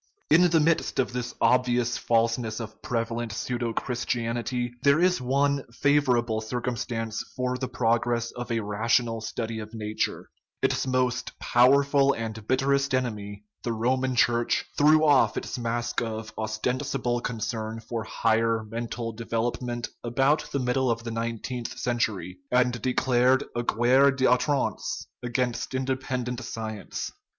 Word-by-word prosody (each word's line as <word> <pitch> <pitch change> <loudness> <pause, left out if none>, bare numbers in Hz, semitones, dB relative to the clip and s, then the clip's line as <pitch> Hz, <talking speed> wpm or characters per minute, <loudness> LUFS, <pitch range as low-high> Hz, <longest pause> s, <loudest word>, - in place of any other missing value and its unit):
In 175 +2 +6
the 165 -1 +4
midst 160 +1 +1
of 125 -2 0
this 125 -1 -4
obvious 125 -1 +2
falseness 115 -1 +1
of 110 -2 -8
prevalent 115 -1 -2
pseudo 120 +2 -2
Christianity 120 0 -2
there 140 +2 +4
is 180 -4 +3
one 140 +2 +1
favorable 125 -5 +2
circumstance 115 -1 -3
for 125 0 -1
the 130 0 -3
progress 120 0 0
of 120 -1 -6
a 115 -1 +1
rational 115 +2 +1
study 110 0 -4
of 110 +1 -8
nature: 110 -1 -3 0.3
its - - +1
most 125 -1 0
powerful 140 +3 +4
and 110 -2 -6
bitterest 140 +1 +2
enemy, 105 -5 -3 0.2
the 120 - -2
Roman 130 +3 0
Church, 120 -1 +2
threw 155 +2 +5
off 145 -3 +4
its - - -4
mask 120 +1 -1
of 110 -1 -5
ostensible 120 +3 -1
concern 110 -1 -3
for 115 0 -4
higher 115 0 +1
men 115 +2 -5
tal 115 0 -4
development 120 +2 -3
about 135 +5 +1
the - - 0
middle 130 0 +1
of 115 0 -1
the 115 - -4
nineteenth 115 +1 -4
century, 105 -7 -2
and 125 -2 +2
declared 130 +1 +3
a 120 - 0
guerre 120 +4 +4
a - - +5
I'outrance 130 +2 +1 0.2
against 125 +1 -2
in 130 0 -1
dependent 130 -2 -2
science. 110 -2 -5
120 Hz, 140 wpm, -26 LUFS, 115-130 Hz, 0.3 s, In